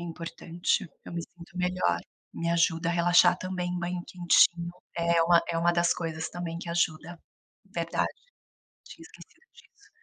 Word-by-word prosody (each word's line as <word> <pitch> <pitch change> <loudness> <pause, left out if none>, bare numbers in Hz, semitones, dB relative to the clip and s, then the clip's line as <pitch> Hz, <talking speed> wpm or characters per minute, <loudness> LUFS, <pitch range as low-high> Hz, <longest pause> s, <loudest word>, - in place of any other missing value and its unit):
É - - -6
importante, 170 +2 -2 0.2
eu - - -9
me 170 - -2
sinto 175 +1 -14
melhor, 180 - 0 0.3
me 170 - -3
ajuda 165 0 +2
a - - +1
relaxar 175 +1 +5
também, 180 -1 -3
banho 175 0 -3
quentinho 175 -1 +3 0.2
é 170 0 +3
uma 170 0 +5
é 165 - -1
uma 170 +1 +3
das 170 0 +3
coisas 160 -2 -4
também 170 -1 -5
que 170 - -8
ajuda. 170 0 -1 0.5
Verdade, - - -1 0.8
tinha - - -13
esquecido - - -17
disso. 420 +1 -22
170 Hz, 155 wpm, -28 LUFS, 170-175 Hz, 0.8 s, relaxar